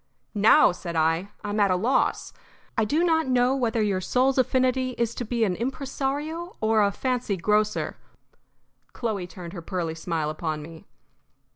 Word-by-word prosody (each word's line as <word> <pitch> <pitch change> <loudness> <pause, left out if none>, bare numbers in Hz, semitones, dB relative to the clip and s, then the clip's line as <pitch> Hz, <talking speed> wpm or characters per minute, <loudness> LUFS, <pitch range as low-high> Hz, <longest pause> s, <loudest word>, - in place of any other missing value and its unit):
"Now," 220 +8 +6
said 175 -1 -7
I, 165 +4 +1
"I 205 - -3
am 210 - -1
at 200 -1 +4
a 185 - +3
loss. 230 +9 0 0.4
I 220 - +2
do 305 +10 +1
not 320 -4 +2
know 255 +1 +3
whether 230 -4 0
your 195 -3 0
soul's 260 +7 +2
affinity 255 0 +1
is 235 -1 0
to 245 - -4
be 235 0 -1
an 190 -4 +1
impresario 280 - -3
or 220 0 +3
a 200 -1 +3
fancy 245 -3 -1
grocer." 210 +4 0 1.0
Chloe 210 -7 -3
turned 175 -1 -9
her 175 - -6
pearly 170 -2 -3
smile 160 -2 -2
upon 155 -1 -4
me. 160 +1 -12
220 Hz, 165 wpm, -25 LUFS, 180-255 Hz, 1.0 s, Now